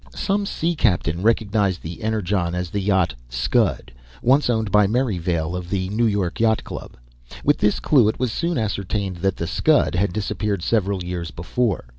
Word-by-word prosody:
Some 200 +1 0
sea 170 -1 -1
captain 90 - +1
recognized 105 -3 +1
the 85 +7 -7
Energon 100 -5 -1
as 90 -1 -3
the 100 - -1
yacht 95 -2 +2 0.2
Scud, - - 0 0.3
once 135 +2 +4
owned 110 -4 0
by 105 0 +5
Merrivale 90 -8 -1
of 90 -1 -5
the 95 -1 -1
New 115 +3 +1
York 100 -5 -1
Yacht 110 -1 +2
Club. - - -8 0.5
With 145 - +3
this 105 - +2
clue 130 -8 +4
it 110 - 0
was 125 -2 0
soon 170 +7 -1
ascertained 100 -3 -2
that 95 +2 -1
the 85 - -2
Scud - - +2
had 90 +2 +1
disappeared 105 -2 -2
several 100 -4 0
years 90 -1 -4
before. 100 - -2
100 Hz, 175 wpm, -22 LUFS, 90-110 Hz, 0.5 s, by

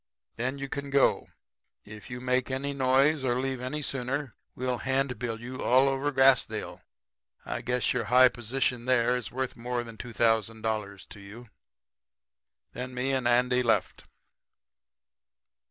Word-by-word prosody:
Then 130 +4 -2
you 140 0 -5
can 140 0 -5
go. 140 0 +2 0.6
If 105 +2 -11
you 125 0 -6
make 125 0 0
any 135 +2 -2
noise 135 +2 +3
or 120 -2 +1
leave 130 -1 -2
any 145 +4 -4
sooner 135 0 -3 0.2
we'll 125 -1 -2
handbill 125 -4 -1
you 125 +2 -7
all 130 +2 +4
over 135 +2 0
Grassdale. 135 -1 +2 0.6
I - - -4
guess 125 0 0
your 125 -3 -1
high 125 +2 +6
position 120 +1 -2
there 125 -1 +3
is 125 -2 -4
worth 130 0 -3
more 120 +1 -3
than 115 -1 -11
$2,000 110 -3 -1
to 105 - -11
you.' 105 +4 -12 1.2
"Then 125 0 -6
me 125 +2 -1
and 130 -2 0
Andy 125 +1 +3
left. 110 -5 0
125 Hz, 140 wpm, -28 LUFS, 120-135 Hz, 1.2 s, high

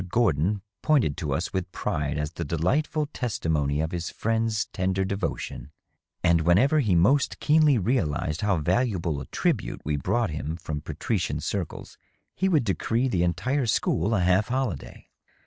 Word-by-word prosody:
Gordon 95 -2 +1 0.2
pointed 130 - +2
to 75 -5 -3
us 80 +5 -2
with 95 -2 -2
pride 75 0 -2
as 75 +1 -2
the 85 - -5
delightful 130 - 0
testimony 80 - -1
of 80 +1 -2
his 85 -1 -3
friends' 110 -1 0
tender 95 +1 0
devotion, 95 -6 -4 0.5
and 85 -2 +4
whenever 110 - +4
he 105 -10 +2
most 130 +12 +3
keenly 150 -3 +4
realized 90 - 0
how 100 -3 +2
valuable 90 - 0
a 65 - -8
tribute - - -1
we 75 0 0
brought 105 +6 0
him 75 +1 -4
from 75 -3 -5
patrician 85 +6 -2
circles - - -5 0.4
he 190 - +1
would 155 -8 +3
decree 115 +4 0
the 90 -7 0
entire 125 - 0
school 105 -1 +1
a 95 - +1
half 90 +4 +3
holiday. 125 - -3
95 Hz, 155 wpm, -26 LUFS, 80-120 Hz, 0.5 s, and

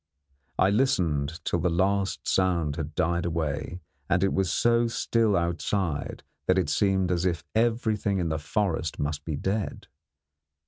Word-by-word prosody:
I 95 - +4
listened 85 - +1
till 85 - 0
the 90 +2 +1
last 95 +3 0
sound 85 -6 +1
had 75 -1 -5
died 85 +1 +1
away 80 +1 -3 0.3
and 90 +2 +2
it 95 - +2
was 95 -4 +1
so 120 +3 +3
still 115 -2 +1
outside 85 -1 -2 0.2
that 95 - +4
it 90 -6 +1
seemed 95 -2 +2
as 90 -1 0
if 85 -2 0
everything 110 -3 +1
in 85 -3 0
the 80 0 -1
forest 80 -1 -1
must 75 0 -2
be 80 - -2
dead. 95 +7 -2
90 Hz, 150 wpm, -27 LUFS, 80-100 Hz, 0.3 s, I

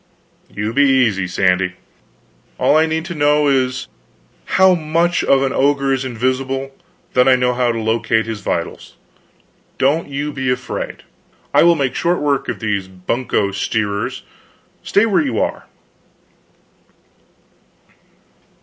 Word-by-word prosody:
"You 105 +2 -4
be 140 - +3
easy, 110 -8 +2
Sandy. 90 0 +1 0.8
All - - +3
I 160 +1 +4
need 160 +1 -2
to 175 - -5
know 150 -1 +2
is, 130 -1 0 0.7
how 190 0 +6
much 170 +1 0
of 135 0 +3
an 135 - -1
ogre 140 0 +2
is 135 0 -1
invisible; 130 +2 -2 0.4
then 125 0 +4
I 130 - +6
know 125 -1 +1
how 120 -1 +1
to 115 - -3
locate 110 0 0
his 110 -2 -5
vitals. 85 -3 -4 0.8
Don't 145 +4 +1
you 145 +2 -3
be 130 -2 -2
afraid, 125 - -4 0.5
I - - +5
will 170 0 +5
make 135 -4 -1
short 175 +1 0
work 145 -2 -1
of - - -3
these 100 -4 -2
bunco 100 +2 -2
steerers. 100 +1 -2 0.6
Stay 205 - +2
where 195 -6 +2
you 130 -7 -2
are." - - -2
130 Hz, 135 wpm, -18 LUFS, 110-145 Hz, 0.8 s, how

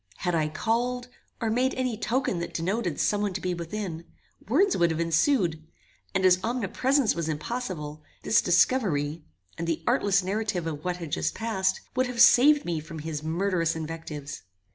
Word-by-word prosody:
Had 180 - -1
I 155 -2 +1
called, 245 +8 -1 0.3
or 225 -2 -1
made 255 +3 +1
any 255 -3 -1
token 230 -3 -1
that 170 - -5
denoted 180 -1 -1
some 205 -1 +1
one 205 -2 -1
to 190 - -3
be 180 -1 -2
within, 170 -1 -5 0.4
words 365 - +3
would 170 -1 +3
have 160 0 -2
ensued; 170 - +1 0.5
and 190 -1 +2
as 185 0 +6
omnipresence 250 +3 +1
was 165 -2 -3
impossible, 155 -3 -4 0.2
this 215 - +4
discovery, 170 - +2 0.4
and 170 - -3
the 165 -2 -1
artless 200 -6 +2
narrative 195 -2 -2
of 155 -2 -4
what 180 -1 -2
had 165 -4 -7
just 80 0 -1
passed, 190 -4 -1
would 255 0 +2
have 250 -1 -5
saved 280 +5 +7
me 170 -2 -1
from 160 +1 -9
his 155 -1 -4
murderous 165 +1 0
invectives. 155 -3 -6
185 Hz, 170 wpm, -27 LUFS, 165-230 Hz, 0.5 s, saved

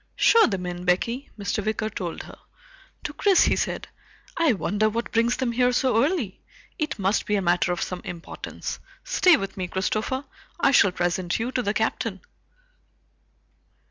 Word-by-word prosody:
"Show 460 -1 +5
them 190 -5 -3
in, 175 0 -5
Becky," 230 +9 0
Mr. 205 +1 -2
Wicker 215 +1 -1
told 175 -5 -5
her. - - -13 0.6
To - - -4
Chris 395 -3 +4
he - - +3
said, - - -2 0.5
"I 330 -6 +3
wonder 210 +1 +1
what 230 +2 -3
brings 230 +1 +2
them 260 -2 0
here 250 +1 +2
so 245 -2 +2
early? 280 - -1 0.4
It 305 -5 -2
must 195 +1 0
be 210 - +2
a 200 - +1
matter 175 0 +2
of 175 - -1
some 180 -1 -5
importance. 170 -1 -6 0.2
Stay 360 -4 +5
with 195 0 -5
me, 185 -1 -2
Christopher. 215 +9 -2 0.3
I - - +4
shall 200 -7 +5
present 175 0 -1
you 235 +3 -2
to 255 - 0
the 205 -2 -1
Captain." 220 -3 -1
215 Hz, 170 wpm, -25 LUFS, 185-250 Hz, 0.6 s, Show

